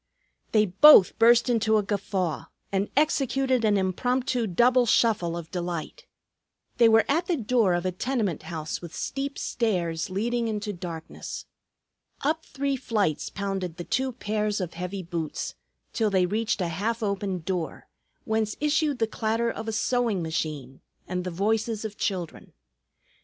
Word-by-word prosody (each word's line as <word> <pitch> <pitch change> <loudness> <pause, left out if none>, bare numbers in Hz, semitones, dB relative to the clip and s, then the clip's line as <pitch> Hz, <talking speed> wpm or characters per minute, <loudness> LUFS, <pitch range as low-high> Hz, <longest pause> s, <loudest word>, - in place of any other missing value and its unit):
They 215 -1 +4
both 200 +1 +7
burst 235 +1 +6
into 225 -2 +3
a 210 - +1
guffaw 190 -6 -2 0.3
and 195 +1 0
executed 270 -4 +2
an 210 -2 +3
impromptu 245 +5 0
double 240 +6 +4
shuffle 195 -8 +2
of 165 -1 -8
delight. 175 - -5 0.7
They 235 -2 +6
were 225 0 +5
at 330 +5 +1
the 350 - +1
door 225 -6 +2
of 175 +1 -2
a 185 - +1
tenement 210 - -1
house 160 -2 -5
with 170 -2 -9
steep 275 +1 -3
stairs 175 -8 -1
leading 230 +5 -1
into 210 -1 -3
darkness. 170 -3 -7 0.8
Up 315 +3 0
three 280 0 -2
flights 210 - -1
pounded 195 -4 -4
the 175 - -5
two 260 +8 -1
pairs 210 -2 -1
of 180 -3 -4
heavy 180 +3 -5
boots, 165 -2 -4 0.4
till 220 -2 +1
they 190 -2 +3
reached 215 +3 -1
a 175 - 0
half 220 +7 -2
open 200 -3 -2
door, 175 -1 -4 0.4
whence 220 -1 0
issued 300 -1 +1
the 225 - +2
clatter 225 +1 -1
of 220 0 -7
a - - -1
sewing 225 -4 0
machine 150 -5 -4 0.3
and 180 0 -2
the 180 - -3
voices 215 +4 -1
of 210 -1 -5
children. 180 -6 -4
210 Hz, 150 wpm, -26 LUFS, 180-235 Hz, 0.8 s, both